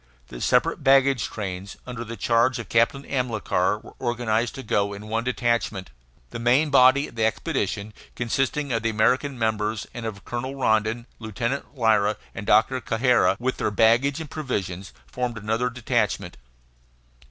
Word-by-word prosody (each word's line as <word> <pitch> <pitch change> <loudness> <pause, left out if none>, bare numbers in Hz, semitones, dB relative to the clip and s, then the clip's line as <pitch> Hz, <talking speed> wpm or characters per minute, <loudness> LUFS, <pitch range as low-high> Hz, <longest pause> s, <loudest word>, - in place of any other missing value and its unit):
The - - -9
separate - - +2
baggage 135 -4 +4
trains, 100 -2 -6
under 125 -2 -6
the 115 0 -8
charge 120 +2 +2
of 115 -5 -7
Captain 115 +4 +2
Amilcar, 110 -7 0
were - - -13
organized 120 -2 -1
to 135 - -7
go 100 -2 0
in 105 +2 -9
one 115 +1 -1
detachment. 120 - -1 0.4
The - - -5
main 130 +6 +3
body 135 +1 +5
of - - -14
the 115 -1 -1
expedition, 110 - -1 0.2
consisting 135 +3 -1
of 115 - 0
the 115 - 0
American 125 +5 +1
members, 110 -1 -1
and 115 -2 -5
of 100 -3 -8
Colonel 130 +3 -4
Rondon, 110 -2 +1
Lieutenant 120 +6 -4
Lyra, 110 -3 +3 0.2
and 105 - -7
Doctor 125 +5 +3
Cajazeira, 120 -1 +2
with 130 +2 -1
their - - 0
baggage 115 +7 +3
and 155 -3 -7
provisions, 95 - -4
formed 125 -2 -4
another 110 +4 -1
detachment. 110 -7 -1
115 Hz, 155 wpm, -24 LUFS, 110-125 Hz, 0.4 s, body